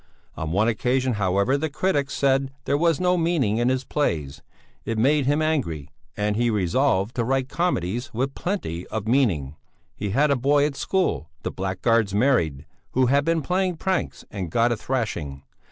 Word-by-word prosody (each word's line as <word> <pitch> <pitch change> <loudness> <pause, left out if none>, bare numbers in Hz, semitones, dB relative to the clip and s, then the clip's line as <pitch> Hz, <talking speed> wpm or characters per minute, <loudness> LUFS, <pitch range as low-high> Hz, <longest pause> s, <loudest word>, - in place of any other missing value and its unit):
On 80 - -4
one 100 +5 +2
occasion 125 +3 +1
however 100 +6 +1
the 160 +2 -1
critics 145 -3 0
said 135 -1 +2 0.2
there - - +1
was 165 0 +2
no 180 0 +2
meaning 160 -11 +1
in 120 +1 +2
his 130 0 0
plays; 80 - -2 0.4
it 115 +1 -3
made 135 +4 +3
him 145 +2 +2
angry, 85 - -1 0.3
and 105 0 0
he 120 +2 +2
resolved 105 +1 +1
to 120 - +2
write 135 +2 0
comedies 120 - -1
with 135 +4 -2
plenty 90 - -3
of 110 -1 -4
meaning. 90 - +1 0.4
He 105 - -3
had 140 +8 +2
a - - +4
boy 140 +3 +3
at 145 -2 -2
school 185 - -1
the - - -2
blackguard's 100 +2 0
married 85 - +1 0.3
who 130 0 +3
had 140 +3 +3
been 165 0 +1
playing 180 +2 0
pranks 190 +2 -2
and 95 -4 -4
got 115 +7 +2
a - - +2
thrashing. 90 - -3
125 Hz, 175 wpm, -24 LUFS, 100-145 Hz, 0.4 s, a